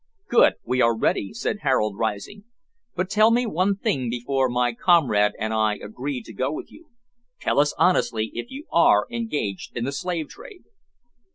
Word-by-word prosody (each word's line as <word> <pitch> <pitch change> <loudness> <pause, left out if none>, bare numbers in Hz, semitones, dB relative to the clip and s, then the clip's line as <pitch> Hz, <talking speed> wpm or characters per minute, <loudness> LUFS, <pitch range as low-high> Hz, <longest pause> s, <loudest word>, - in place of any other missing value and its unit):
"Good, - - +5
we 130 0 0
are 115 -1 +3
ready," 100 -3 0
said 205 - -3
Harold, 115 -7 +1
rising, 110 - -4 0.5
"but 185 +1 -1
tell 215 +3 +4
me 240 +2 +2
one 195 -1 +1
thing 160 - -1
before 130 +2 0
my 120 0 0
comrade 115 - +3
and 110 +1 -2
I 110 -1 +1
agree 125 +6 -6
to 115 - -12
go 130 +7 -1
with 155 - -7
you, 330 - -17 0.5
tell - - 0
us 145 0 +2
honestly 115 -11 +1
if - - -6
you 275 +4 -9
are - - +4
engaged 150 - -4
in 120 - -2
the 135 - -2
slave 170 0 -3
trade." 425 -7 -13
135 Hz, 175 wpm, -23 LUFS, -, 0.5 s, Good